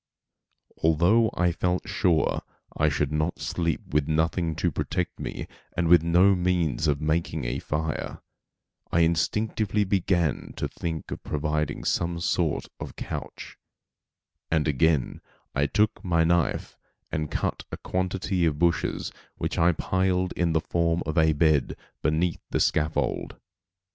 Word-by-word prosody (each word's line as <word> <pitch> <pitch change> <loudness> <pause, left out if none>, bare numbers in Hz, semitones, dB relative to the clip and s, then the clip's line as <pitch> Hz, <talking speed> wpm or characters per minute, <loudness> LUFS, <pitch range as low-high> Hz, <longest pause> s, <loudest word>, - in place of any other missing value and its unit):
Although 85 +9 +4
I 90 -1 +2
felt 90 +2 -1
sure 85 -5 +1 0.3
I 75 - +3
should 70 0 -1
not 75 +3 0
sleep 85 -2 -1
with 75 -1 +2
nothing 80 +1 0
to 85 +1 0
protect - - -2
me - - -5 0.3
and 85 - +2
with 85 -1 +7
no 90 +4 +5
means 90 -6 +1
of 70 -2 +2
making 80 -2 -1
a - - -2
fire, 75 -1 -3 0.7
I 85 - +3
instinctively 105 +5 +1
began 90 -5 0
to - - -2
think 80 -3 -5
of - - -5
providing 75 -1 -2
some 85 0 0
sort 85 -2 0
of - - -7
couch; - - -7 0.9
and 80 -1 +1
again 75 -1 +1 0.3
I 70 +2 +1
took 105 +10 +1
my 85 -3 +2
knife 85 0 0 0.3
and 75 -1 -2
cut - - -2
a - - -4
quantity 95 0 -1
of 75 -2 -1
bushes 85 +1 0 0.2
which - - -3
I 85 +1 +5
piled 95 +1 0
in 85 -2 0
the 80 - +2
form 85 0 0
of 80 +1 -3
a 80 -1 +4
bed 75 -2 +2 0.3
beneath 80 +2 0
the - - 0
scaffold. 80 +1 0
85 Hz, 140 wpm, -26 LUFS, 75-90 Hz, 0.9 s, with